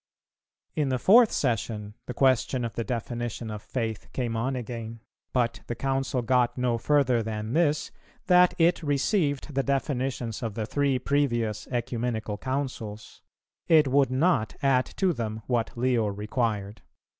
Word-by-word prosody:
In 145 Hz, -3 st, +1 dB
the 130 Hz, -, +1 dB
fourth 220 Hz, -, +6 dB
Session 110 Hz, -4 st, -1 dB
the 125 Hz, -, -5 dB
question 130 Hz, -1 st, +2 dB
of 115 Hz, -, -5 dB
the 115 Hz, -, -2 dB
definition 120 Hz, -1 st, -4 dB
of 105 Hz, -1 st, -6 dB
faith 115 Hz, -4 st, -4 dB
came 120 Hz, -3 st, -2 dB
on 130 Hz, +4 st, -1 dB
again, 115 Hz, -2 st, -6 dB, 0.3 s
but 120 Hz, -2 st, 0 dB
the 120 Hz, -, -3 dB
Council 135 Hz, 0 st, -1 dB
got 125 Hz, 0 st, +2 dB
no 125 Hz, -2 st, 0 dB
further 130 Hz, -4 st, +2 dB
than 110 Hz, +1 st, -4 dB
this, 155 Hz, -2 st, +1 dB, 0.3 s
that 180 Hz, -1 st, +5 dB
it 170 Hz, 0 st, +3 dB
received 145 Hz, -, 0 dB
the 135 Hz, -, +2 dB
definitions 130 Hz, -4 st, -2 dB
of 115 Hz, -4 st, -4 dB
the 110 Hz, -, -2 dB
three 140 Hz, +2 st, +1 dB
previous 120 Hz, -6 st, 0 dB
Ecumenical 120 Hz, -3 st, -2 dB
Councils; 130 Hz, -5 st, -4 dB, 0.5 s
it 155 Hz, -4 st, +5 dB
would 135 Hz, -1 st, +3 dB
not 130 Hz, -4 st, +1 dB
add 130 Hz, -2 st, +3 dB
to 190 Hz, -2 st, +2 dB
them 110 Hz, -4 st, -4 dB
what 120 Hz, -2 st, -1 dB
Leo 120 Hz, -3 st, +2 dB
required. 105 Hz, 0 st, -2 dB
125 Hz, 145 wpm, -27 LUFS, 115-135 Hz, 0.5 s, fourth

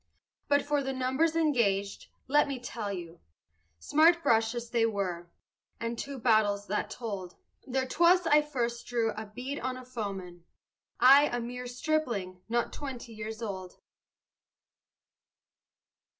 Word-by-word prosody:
But 285 Hz, -1 st, +3 dB
for 290 Hz, -1 st, 0 dB
the 270 Hz, 0 st, -3 dB
numbers 265 Hz, +6 st, +1 dB
engaged, 220 Hz, -11 st, +1 dB, 0.2 s
let 295 Hz, +2 st, +4 dB
me 275 Hz, -2 st, -3 dB
tell 230 Hz, -4 st, -5 dB
you, 175 Hz, -3 st, -7 dB, 0.6 s
Smart 330 Hz, -, +4 dB
brushes 230 Hz, +1 st, +1 dB
they 230 Hz, -2 st, +3 dB
were, 180 Hz, -5 st, -3 dB, 0.5 s
and 230 Hz, 0 st, -3 dB
two 275 Hz, +4 st, -5 dB
battles 215 Hz, -4 st, +2 dB
that 210 Hz, +1 st, -2 dB
told; 200 Hz, -6 st, -6 dB, 0.3 s
There 265 Hz, 0 st, 0 dB
'twas 345 Hz, +5 st, +4 dB
I 300 Hz, -2 st, +5 dB
first 240 Hz, -5 st, -3 dB
drew 230 Hz, -2 st, 0 dB
a 215 Hz, 0 st, -7 dB
bead 250 Hz, +7 st, -5 dB
on 255 Hz, +1 st, -3 dB
a 255 Hz, -, -10 dB
foeman 195 Hz, -8 st, -6 dB, 0.6 s
I, 275 Hz, +4 st, +8 dB
a 245 Hz, -, -2 dB
mere 250 Hz, +1 st, -5 dB
stripling, 245 Hz, -, -2 dB
not 235 Hz, +1 st, 0 dB
twenty 255 Hz, -5 st, -7 dB
years 220 Hz, +1 st, -6 dB
old. 190 Hz, -4 st, -6 dB
235 Hz, 135 wpm, -30 LUFS, 210-270 Hz, 0.6 s, I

